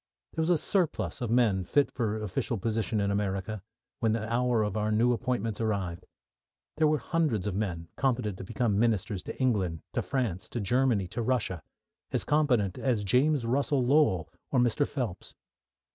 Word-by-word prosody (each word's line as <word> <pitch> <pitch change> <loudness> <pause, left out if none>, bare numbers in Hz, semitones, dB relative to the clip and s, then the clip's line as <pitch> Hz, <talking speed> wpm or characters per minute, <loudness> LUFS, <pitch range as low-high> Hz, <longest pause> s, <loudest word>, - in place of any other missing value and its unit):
There 160 - -1
was 160 - +1
a 175 - +5
surplus 170 -5 0
of 120 - -2
men 110 -6 +3
fit 140 +10 +2
for 110 -3 -1
official 105 +4 -2
position 110 0 -1
in 100 0 +1
America 100 0 -2 0.4
when 110 -1 +2
the 110 0 -2
hour 120 -2 +2
of 105 -2 -2
our 110 0 0
new 120 +3 +3
appointments 115 -3 -2
arrived. 95 -6 -2 0.7
There 155 0 +4
were 150 0 +3
hundreds 150 - 0
of 105 - -1
men 90 -5 -2
competent 120 -7 0
to - - -5
become 105 0 0
ministers 105 -4 +1
to - - -8
England, 95 - 0
to - - 0
France, 115 -10 -2
to 120 - -3
Germany, 115 -2 +2
to 115 - -3
Russia; 115 -7 0 0.5
as - - 0
competent 125 -11 +2
as 120 -6 0
James 130 +6 +3
Russell 135 +1 +1
Lowell 125 - +3 0.2
or 130 - +2
Mr. 125 +4 +2
Phelps. 115 -9 -4
115 Hz, 175 wpm, -29 LUFS, 100-130 Hz, 0.7 s, a